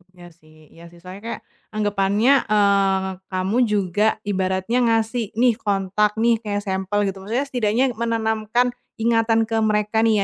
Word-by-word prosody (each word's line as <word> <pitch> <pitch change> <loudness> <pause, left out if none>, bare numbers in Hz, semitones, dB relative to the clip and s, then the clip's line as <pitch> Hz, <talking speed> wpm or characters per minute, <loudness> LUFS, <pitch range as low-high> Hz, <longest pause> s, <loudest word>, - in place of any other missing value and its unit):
Iya 175 -1 -13
sih 155 -1 -22 0.2
iya 165 - -14
sih. 175 - -17
Soalnya 185 +3 -11
kayak, - - -5 0.3
anggepannya, 205 +3 +1 0.2
eee, 195 -2 +2 0.2
kamu 185 +4 -1
juga 210 -2 +1 0.2
ibaratnya 190 +3 -1
ngasih, 225 0 0
"Nih 245 -2 +4
kontak 205 -2 0
nih," 235 +1 +3
kayak 205 -1 -2
sampel 190 +2 -1
gitu. 195 0 -4
Maksudnya 240 +8 -2
setidaknya 245 -1 +1
menanamkan 230 +1 0 0.2
ingatan 225 0 +2
ke 225 - -3
mereka 215 +1 +1
nih 225 -1 +3
210 Hz, 145 wpm, -21 LUFS, 195-225 Hz, 0.3 s, Nih